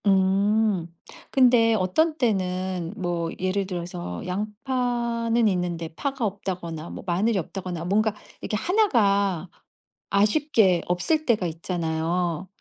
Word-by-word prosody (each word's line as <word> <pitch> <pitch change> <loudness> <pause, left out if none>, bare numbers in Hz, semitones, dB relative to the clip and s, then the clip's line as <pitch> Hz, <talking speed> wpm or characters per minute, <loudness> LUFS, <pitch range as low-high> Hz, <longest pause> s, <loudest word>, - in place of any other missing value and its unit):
음. 195 0 +3 0.4
근데 240 -4 +5
어떤 300 - +1
때는 185 - -1
뭐 175 -3 -2
예를 185 +1 0
들어서 170 - -5
양파는 235 +3 0
있는데 175 -4 -1
파가 275 - -2
없다거나, 180 -5 -4
뭐 - - -8
마늘이 195 +5 +1
없다거나 180 -1 -4
뭔가 210 +3 +1 0.3
이렇게 210 - -2
1 395 - +2
가 200 - +2 0.6
아쉽게 210 - +3
없을 250 - 0
때가 220 -6 +2
있잖아요. 170 +1 -2
195 Hz, 240 characters per minute, -25 LUFS, 175-225 Hz, 0.6 s, 근데